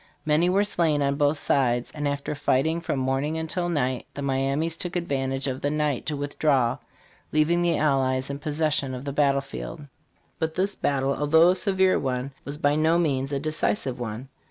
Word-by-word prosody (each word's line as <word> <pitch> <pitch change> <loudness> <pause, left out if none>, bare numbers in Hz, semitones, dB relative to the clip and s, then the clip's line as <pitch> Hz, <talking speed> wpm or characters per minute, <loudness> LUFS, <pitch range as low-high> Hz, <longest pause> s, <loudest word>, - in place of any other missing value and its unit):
Many 155 +3 +3
were 195 +3 +3
slain 160 -7 +1
on 140 0 +1
both 145 +1 +1
sides; 120 -4 +1
and 145 -1 -3
after 140 +1 -2
fighting 145 +3 +1
from 155 - -2
morning 135 +4 -1
until 175 +2 -2
night, 130 -6 -1
the 140 - -4
Miamis 140 +4 0
took 175 +1 -5
advantage 135 -5 -1
of 130 -1 -3
the 145 - 0
night 150 -3 -1
to 150 -2 -1
withdraw, 145 -4 +1 0.5
leaving 155 +3 +2
the 175 -1 +2
allies 130 -3 +1
in 140 0 -5
possession 150 -3 -1
of 125 +2 -7
the 140 - -3
battle 140 -1 +3
field. 140 +3 -7 0.6
But 160 -1 -2
this 195 +2 0
battle, 140 -1 0
although 160 +4 +5
a - - +5
severe 190 0 +2
one, 130 0 -2
was 145 +1 -5
by 145 -1 +2
no 160 +2 +3
means 140 -5 0
a 140 - 0
decisive 155 -2 -1
one. 120 +2 -5
145 Hz, 185 wpm, -25 LUFS, 135-160 Hz, 0.6 s, although